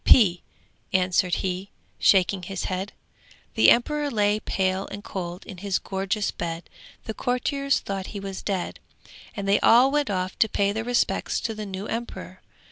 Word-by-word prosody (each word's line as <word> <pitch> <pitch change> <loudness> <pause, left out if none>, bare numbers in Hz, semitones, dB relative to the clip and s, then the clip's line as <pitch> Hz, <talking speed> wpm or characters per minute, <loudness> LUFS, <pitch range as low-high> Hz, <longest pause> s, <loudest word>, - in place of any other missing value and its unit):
'P,' 185 -7 +6 0.5
answered 180 -2 +2
he, 185 +1 -3 0.3
shaking 190 0 +4
his 185 +1 -5
head. 190 +2 -3 0.6
The - - +6
emperor 295 +4 +3
lay 210 -3 +2
pale 190 -2 -1
and 205 0 -7
cold 180 -1 -6
in 190 - -9
his 200 0 0
gorgeous 195 +2 -2
bed, 165 0 -5 0.4
the 220 - -4
courtiers 275 +4 0
thought 195 -1 -4
he 205 - -6
was 195 -1 -6
dead, 190 -3 -3 0.6
and 200 -1 -4
they 200 - +4
all 250 +4 +6
went 295 -1 +1
off 185 -1 -2
to 220 - +4
pay 200 0 +1
their 220 +2 -2
respects 245 0 0
to 225 - -2
their 215 -1 -6
new 190 +1 -5
emperor. 215 - -6
200 Hz, 165 wpm, -25 LUFS, 185-220 Hz, 0.6 s, P